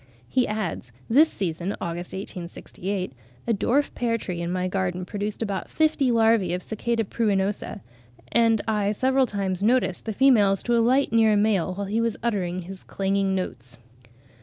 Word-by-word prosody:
He 250 - +1
adds, 210 - -3 0.2
"this 305 +7 +6
season 180 - -3
(Aug. 170 0 -3
1868) 180 -1 -5 0.3
a 235 - +1
dwarf 260 +7 +1
pear 230 -1 0
tree 180 -5 -5
in 170 0 -2
my 185 0 -1
garden 185 -1 -2
produced 205 +3 -3
about 200 -3 -3
fifty 310 -4 +2
larvae 225 -6 +3
of 180 - -6
Cic. 220 - -7 0.3
pruinosa; 205 -1 -1 0.5
and 225 -2 +3
I 210 -2 +1
several 260 +3 +2
times 195 -3 -2
noticed 225 -4 +1
the 220 - -2
females 205 -6 +4
to 240 - +1
alight 240 +2 +3
near 225 -1 +5
a - - +3
male 200 -4 +1
while 200 +1 -3
he 215 +4 0
was 230 -1 -1
uttering 185 -6 -1
his 190 +2 -9
clanging 195 0 0
notes." 125 -9 -5
200 Hz, 160 wpm, -25 LUFS, 185-230 Hz, 0.5 s, this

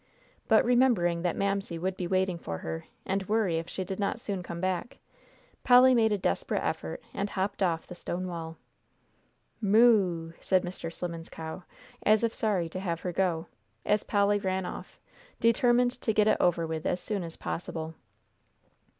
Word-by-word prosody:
But - - +5
remembering 235 -9 +3
that 175 -1 0
Mamsie 195 -3 -1
would 185 +3 -2
be 180 -2 -3
waiting 185 -1 +1
for 85 - -5
her, 80 0 -5 0.2
and 195 0 -2
worry 205 -7 +2
if 165 - -7
she 190 - -3
did 190 +2 -5
not 200 +3 -1
soon 200 -6 -3
come 170 -1 -6
back, 185 +5 -2 0.7
Polly 255 +1 +7
made 225 -3 +4
a 210 - +2
desperate 90 - -1
effort 80 0 -3
and 200 +1 -2
hopped 195 +1 -2
off 170 -4 +1
the - - -9
stone 180 +1 -4
wall. 165 -2 -6 1.0
"Moo!" 200 -6 +4
said 185 -1 +2
Mr. 175 -2 -5
Slimmen's 170 -1 -6
cow, 160 +3 -7 0.4
as 215 +1 +4
if 230 -1 +1
sorry 200 -6 0
to 185 - -5
have 170 -3 -3
her 180 - -3
go, 175 -3 0 0.4
as 210 0 +2
Polly 205 0 +2
ran 190 -1 -1
off, - - -8 0.4
determined 240 +2 +4
to 220 - +1
get 210 0 +3
it - - +4
over 170 -2 +2
with 160 -1 -3
as 180 - 0
soon 205 +1 -3
as 165 -2 -7
possible. 160 -1 -4
185 Hz, 175 wpm, -29 LUFS, 170-210 Hz, 1.0 s, Polly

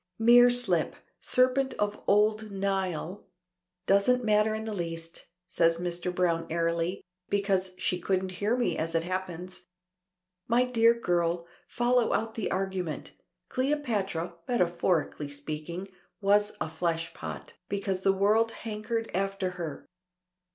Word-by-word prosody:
"Mere 240 +2 +7
slip. 220 -10 +1 0.2
Serpent 255 +1 +2
of 205 0 -2
old 215 +1 +3
Nile. 195 -2 -2 0.6
Doesn't 220 +6 +3
matter 215 0 +3
in 220 0 -4
the 220 - -3
least," 165 -2 -6 0.2
says 165 -2 +3
Mr. 175 +1 -2
Browne 170 -2 0
airily, 170 +2 -1 0.3
"because 195 -2 0
she 180 - 0
couldn't 190 0 0
hear 220 +4 +2
me 245 - +1
as 165 +1 -2
it 165 - +2
happens. 180 0 -5 0.8
My 240 +2 +3
dear 230 -2 +4
girl, 170 -3 0 0.2
follow 245 -1 +2
out 225 0 -1
the 220 - -2
argument. 185 -4 -3 0.4
Cleopatra, 220 - -1
metaphorically 175 -8 0
speaking, 155 +6 -5 0.3
was 205 +1 +3
a - - -1
fleshpot, 165 +1 -4 0.2
because 195 -2 -2
the 195 - +4
world 210 +4 +3
hankered 225 +1 -3
after 195 0 -1
her. 170 -5 -6
195 Hz, 125 wpm, -29 LUFS, 170-220 Hz, 0.8 s, Mere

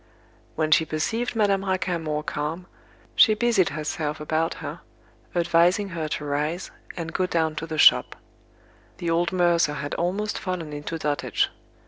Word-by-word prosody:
When 155 -1 0
she 160 - +6
perceived 225 +11 -2
Madame 200 -3 +2
Raquin 185 -3 -1
more 150 -1 -2
calm, 155 +4 -3 0.5
she 215 - +6
busied 220 -5 +2
herself 150 0 -3
about 160 +2 -1
her, - - -7 0.6
advising 175 +3 +3
her 165 -3 -3
to 150 0 -4
rise, 150 +5 -2 0.3
and 165 -1 -5
go 185 - +1
down 160 -3 0
to 160 - -4
the 160 -1 -4
shop. - - +6 0.8
The 170 -1 -2
old 170 +2 +1
mercer 175 -4 +3
had 145 0 -4
almost 195 +5 -1
fallen 175 -5 -4
into 150 +3 -4
dotage. 145 -2 0
165 Hz, 150 wpm, -25 LUFS, 155-185 Hz, 0.8 s, she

